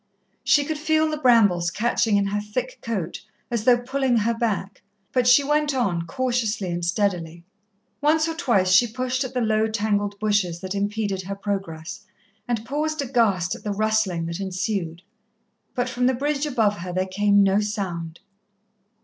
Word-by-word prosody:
She 290 Hz, -1 st, +4 dB
could 310 Hz, 0 st, -3 dB
feel 315 Hz, +1 st, +2 dB
the 305 Hz, -, -3 dB
brambles 205 Hz, -, +4 dB
catching 220 Hz, +2 st, +1 dB
in 200 Hz, -, +1 dB
her 205 Hz, +1 st, -1 dB
thick 245 Hz, +5 st, -4 dB
coat 195 Hz, -7 st, -4 dB, 0.3 s
as 230 Hz, -2 st, -1 dB
though 245 Hz, -1 st, +6 dB
pulling 260 Hz, 0 st, 0 dB
her 225 Hz, +2 st, +1 dB
back, 215 Hz, -4 st, -2 dB, 0.3 s
but 250 Hz, -1 st, +2 dB
she 250 Hz, +3 st, +6 dB
went 295 Hz, 0 st, +1 dB
on, 175 Hz, -9 st, 0 dB
cautiously 230 Hz, -4 st, -1 dB
and 175 Hz, 0 st, -3 dB
steadily. 170 Hz, -2 st, -1 dB, 0.6 s
Once 310 Hz, +2 st, +3 dB
or 325 Hz, -, -2 dB
twice 235 Hz, -, +1 dB
she 205 Hz, +6 st, +6 dB
pushed 255 Hz, +3 st, -2 dB
at 260 Hz, 0 st, -7 dB
the 250 Hz, -, +1 dB
low, 220 Hz, -1 st, +2 dB
tangled 205 Hz, -2 st, -1 dB
bushes 205 Hz, -5 st, 0 dB
that 190 Hz, 0 st, -4 dB
impeded 205 Hz, -1 st, -2 dB
her 195 Hz, +2 st, -5 dB
progress, 195 Hz, -5 st, -5 dB, 0.4 s
and 230 Hz, -2 st, -2 dB
paused 300 Hz, +3 st, -2 dB
aghast 220 Hz, -9 st, +1 dB
at -, -, -9 dB
the 210 Hz, -, -2 dB
rustling 215 Hz, -5 st, 0 dB
that 170 Hz, +2 st, -4 dB
ensued. 185 Hz, -3 st, -3 dB, 0.7 s
But 245 Hz, 0 st, 0 dB
from 250 Hz, 0 st, 0 dB
the 260 Hz, -, +2 dB
bridge 290 Hz, +3 st, -1 dB
above 220 Hz, -7 st, +1 dB
her 180 Hz, +1 st, -5 dB
there 185 Hz, +1 st, 0 dB
came 200 Hz, +1 st, +3 dB
no 195 Hz, +1 st, +3 dB
sound. 180 Hz, -6 st, -4 dB
215 Hz, 170 wpm, -23 LUFS, 190-250 Hz, 0.7 s, though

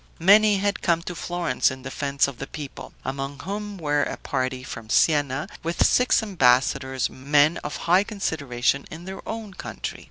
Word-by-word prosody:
Many 205 Hz, +4 st, +6 dB
had 200 Hz, +1 st, -1 dB
come 170 Hz, -1 st, +1 dB
to 180 Hz, -, -5 dB
Florence 175 Hz, -4 st, 0 dB
in 130 Hz, 0 st, -8 dB
defense 140 Hz, +1 st, 0 dB
of 140 Hz, -4 st, -8 dB
the 135 Hz, -, -5 dB
people; 145 Hz, -3 st, -8 dB
among 135 Hz, +1 st, -4 dB
whom 205 Hz, +2 st, -5 dB
were 145 Hz, -3 st, +1 dB
a -, -, -2 dB
party 130 Hz, 0 st, -2 dB
from 115 Hz, -3 st, -8 dB
Sienna, 145 Hz, +2 st, +2 dB
with 170 Hz, +1 st, +1 dB
six 250 Hz, -2 st, +3 dB
ambassadors, 130 Hz, -, +2 dB
men 145 Hz, +4 st, +2 dB
of 150 Hz, +2 st, -5 dB
high 180 Hz, +3 st, +5 dB
consideration 140 Hz, -, -1 dB
in 165 Hz, +2 st, -9 dB
their 190 Hz, +1 st, -7 dB
own 220 Hz, -3 st, -5 dB
country. -, -, -6 dB
150 Hz, 165 wpm, -24 LUFS, 135-190 Hz, -, Many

